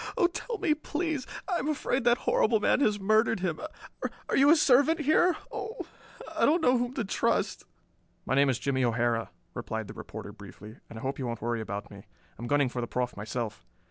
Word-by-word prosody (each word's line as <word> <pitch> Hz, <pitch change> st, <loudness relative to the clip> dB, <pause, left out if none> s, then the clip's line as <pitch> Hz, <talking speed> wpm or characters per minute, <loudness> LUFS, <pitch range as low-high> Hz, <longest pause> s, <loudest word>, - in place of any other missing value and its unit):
Oh, -, -, +4 dB
tell 440 Hz, +6 st, -2 dB
me, 375 Hz, -6 st, +2 dB
please! 305 Hz, -2 st, -3 dB, 0.2 s
I 365 Hz, -3 st, 0 dB
am 275 Hz, -, -3 dB
afraid 270 Hz, -4 st, -1 dB
that 240 Hz, 0 st, +5 dB
horrible 220 Hz, -2 st, +2 dB
man 210 Hz, -, +3 dB
has 210 Hz, -7 st, +2 dB
murdered 215 Hz, +1 st, +2 dB
him. 170 Hz, -4 st, -1 dB, 0.7 s
Are -, -, +1 dB
you 280 Hz, +2 st, +6 dB
a 315 Hz, -, +8 dB
servant 300 Hz, +2 st, +4 dB
here? 315 Hz, +4 st, +3 dB
Oh, 440 Hz, +1 st, -5 dB, 0.5 s
I -, -, 0 dB
don't 320 Hz, +4 st, +5 dB
know 250 Hz, -2 st, +5 dB
whom 245 Hz, +1 st, -1 dB
to 235 Hz, -, -1 dB
trust." 195 Hz, -, 0 dB, 0.6 s
"My -, -, -1 dB
name 140 Hz, +1 st, +4 dB
is 130 Hz, -, +1 dB
Jimmie 130 Hz, -1 st, 0 dB
O'Hara," 115 Hz, -1 st, +1 dB, 0.2 s
replied 110 Hz, -1 st, -4 dB
the -, -, -8 dB
reporter -, -, -8 dB
briefly; 105 Hz, +2 st, -12 dB
"and 115 Hz, -, -9 dB
I -, -, -8 dB
hope 135 Hz, +1 st, -3 dB
you 130 Hz, -, -2 dB
won't 115 Hz, -1 st, -4 dB
worry 120 Hz, -1 st, -1 dB
about 105 Hz, -1 st, -6 dB
me. 100 Hz, -, -10 dB
I 90 Hz, -1 st, -18 dB
am 120 Hz, -, -4 dB
gunning 145 Hz, +1 st, +3 dB
for 125 Hz, 0 st, -4 dB
the 120 Hz, -, -3 dB
Proff 125 Hz, 0 st, -2 dB
myself. 110 Hz, +1 st, -4 dB
195 Hz, 210 wpm, -29 LUFS, -, 0.7 s, a